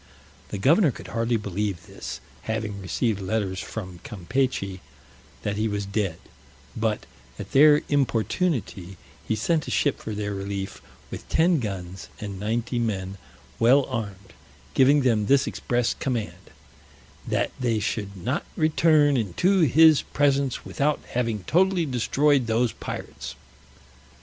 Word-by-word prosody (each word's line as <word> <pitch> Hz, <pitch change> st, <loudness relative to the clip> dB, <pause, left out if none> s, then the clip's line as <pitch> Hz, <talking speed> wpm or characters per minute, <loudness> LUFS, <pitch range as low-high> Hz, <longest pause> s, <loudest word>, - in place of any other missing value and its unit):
The 100 Hz, -, -4 dB
governor 155 Hz, -, +4 dB
could -, -, -8 dB
hardly 115 Hz, 0 st, 0 dB
believe 100 Hz, -3 st, -3 dB
this, -, -, -8 dB, 0.2 s
having 110 Hz, -2 st, -3 dB
received 105 Hz, +3 st, -1 dB
letters 95 Hz, -1 st, -1 dB
from 95 Hz, -6 st, -7 dB
Campechy 100 Hz, -1 st, -2 dB, 0.6 s
that 105 Hz, 0 st, -2 dB
he 110 Hz, +1 st, +1 dB
was 105 Hz, -1 st, -2 dB
dead: 100 Hz, -4 st, -1 dB, 0.6 s
but, 110 Hz, -1 st, -1 dB, 0.3 s
at 100 Hz, -, -8 dB
their 150 Hz, +2 st, +6 dB
importunity, 120 Hz, -, -1 dB, 0.3 s
he 110 Hz, -, +1 dB
sent 155 Hz, +8 st, 0 dB
a -, -, -3 dB
ship 145 Hz, -, +1 dB
for 110 Hz, -, -5 dB
their 105 Hz, 0 st, -3 dB
relief, 100 Hz, 0 st, -5 dB, 0.3 s
with -, -, -8 dB
ten 165 Hz, 0 st, +3 dB
guns 95 Hz, -5 st, -5 dB
and 100 Hz, -3 st, -6 dB
ninety 115 Hz, +4 st, -1 dB
men, 100 Hz, -4 st, -2 dB, 0.4 s
well 130 Hz, +4 st, +5 dB
armed; 100 Hz, -6 st, -6 dB, 0.4 s
giving 140 Hz, +2 st, +5 dB
them 110 Hz, -5 st, +2 dB
this 140 Hz, 0 st, +4 dB
express 120 Hz, -2 st, -1 dB
command, 105 Hz, -9 st, -4 dB, 0.8 s
"that -, -, 0 dB
they 120 Hz, -3 st, +1 dB
should 105 Hz, -2 st, -3 dB
not 125 Hz, -, -2 dB
return 155 Hz, -2 st, +4 dB
into 150 Hz, -, +2 dB
his 160 Hz, 0 st, +6 dB
presence 140 Hz, -2 st, 0 dB
without 150 Hz, +1 st, 0 dB
having 115 Hz, -5 st, -1 dB
totally 180 Hz, -, +2 dB
destroyed 135 Hz, +1 st, +2 dB
those 115 Hz, +1 st, +2 dB
pirates." -, -, -7 dB
115 Hz, 130 wpm, -25 LUFS, 100-140 Hz, 0.8 s, their